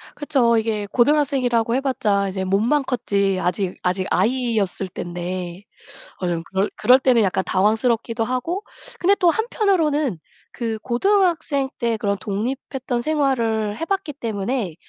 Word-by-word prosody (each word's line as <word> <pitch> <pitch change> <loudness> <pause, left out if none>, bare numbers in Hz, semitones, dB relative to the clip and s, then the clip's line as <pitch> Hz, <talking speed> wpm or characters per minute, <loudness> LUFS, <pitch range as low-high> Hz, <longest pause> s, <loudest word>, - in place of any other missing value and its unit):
그쵸. 265 -6 +2
이게 215 -2 -1
고등학생이라고 245 -2 +2
해 260 - +2
봤자 210 -7 0
이제 190 0 -3
몸만 220 +10 +2
컸지 200 -6 0
아직 180 +1 -1
아직 185 +1 0
아이였을 220 -3 0
때인데 175 +1 -5 0.6
어 180 - 0
좀 170 -1 -1
그럴 195 +1 +1
그럴 255 +1 +5
때는 255 -3 +4
약간 190 -2 +1
당황스럽기도 225 +4 +1
하고 255 - -2 0.4
근데 390 +3 +4
또 355 -3 +3
한편으로는 325 - +1 0.3
그 225 -2 -3
고등학생 310 - +1
때 235 -2 0
그런 200 -1 -1
독립했던 245 +4 -3
생활을 230 -8 0
해 330 - -3
봤기 385 -4 -2
때문에 220 - -3
235 Hz, 315 characters per minute, -22 LUFS, 200-275 Hz, 0.6 s, 그럴